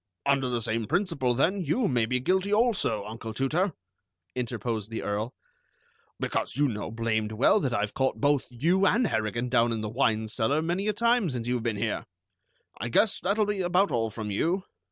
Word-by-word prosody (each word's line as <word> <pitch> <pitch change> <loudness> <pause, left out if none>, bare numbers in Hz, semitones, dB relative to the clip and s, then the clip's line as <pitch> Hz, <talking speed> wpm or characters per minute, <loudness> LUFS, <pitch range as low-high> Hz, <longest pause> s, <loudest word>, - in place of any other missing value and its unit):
"Under 135 -2 +2
the 120 -2 -1
same 115 -1 -1
principle, 165 -9 +1
then, 185 +10 +2
you 190 - +1
may 120 -4 +1
be 125 +2 0
guilty 190 +8 +1
also, 210 - +2
Uncle 110 +1 -7
Tooter," 160 - +1 0.6
interposed 115 -3 -3
the 115 - -4
Earl, 105 +4 -2 0.8
"because - - -2
you 145 0 +3
know 105 -5 -4
blamed 110 -1 -1
well 130 - +4
that 135 -9 -1
I've 105 -3 -1
caught 130 0 0
both 145 -1 +2
you 170 +11 +2
and 235 +7 +3
Harrigan 110 - -1
down 120 -1 +3
in 115 -1 -2
the 105 - -3
wine 110 -2 +1
cellar 125 +7 +1
many 180 +5 -1
a 215 - +2
time 235 -2 +2
since 120 -3 -4
you've 125 -1 0
been 115 -2 -1
here. 110 +1 -2 0.7
I 120 - -3
guess 205 - +3
that'll 210 +3 +1
be 205 -2 -1
about 180 +3 +2
all 115 -1 0
from 105 -1 -5
you." 175 - 0
125 Hz, 190 wpm, -27 LUFS, 115-180 Hz, 0.8 s, well